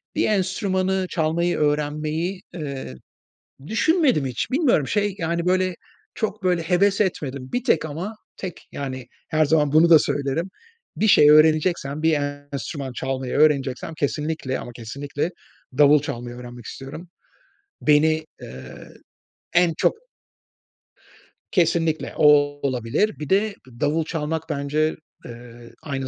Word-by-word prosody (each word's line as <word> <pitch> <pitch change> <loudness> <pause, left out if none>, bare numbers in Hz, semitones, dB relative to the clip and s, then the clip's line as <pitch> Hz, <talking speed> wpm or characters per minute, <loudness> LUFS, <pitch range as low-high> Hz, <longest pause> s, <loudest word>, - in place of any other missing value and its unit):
bir - - +2
enstrümanı 190 -1 0
çalmayı 170 +1 0
öğrenmeyi, 150 +4 -1
eee, 140 - -6 0.7
düşünmedim 255 - +2
hiç. 125 -3 -3
Bilmiyorum 255 - +2
şey, 205 +1 0
yani, 170 0 -2
böyle 185 0 +2 0.4
çok 215 -1 -3
böyle 180 -2 +2
heves 195 +4 +2
etmedim; 140 -9 -2
bir 245 - -1
tek 165 - +2
ama 165 +8 -5 0.2
tek 185 -3 -8
yani, 130 -3 -5 0.2
her 155 -1 +2
zaman 150 -1 +2
bunu 160 +2 +5
da 160 - +9
söylerim. 145 +6 -2 0.5
Bir 220 - +2
şey 150 -6 +7
öğreneceksem, 155 -1 +3
bir 160 0 +3 0.4
enstrüman 135 +1 -5
çalmayı 130 0 -3
öğreneceksem, 140 -1 +1
kesinlikle 150 -2 -2
ama - - -7
kesinlikle 140 +7 -4 0.5
davul 150 0 +6
çalmayı 120 -3 -6
öğrenmek 120 -1 -10
istiyorum. 145 - -9 0.7
Beni, 155 +1 +3 0.2
ııı, 65 0 -11 0.6
en 170 -1 +3
çok - - +3 1.6
Kesinlikle, 165 -3 +1
o, 150 - +5 0.4
olabilir. 130 - -1
Bir 150 -2 -6
de 200 +2 +2 0.2
davul 155 +2 +1
çalmak 160 -1 -3
bence, 150 +2 0 0.3
eee, 120 0 -12
aynı 135 -3 -4
155 Hz, 120 wpm, -23 LUFS, 140-180 Hz, 1.6 s, da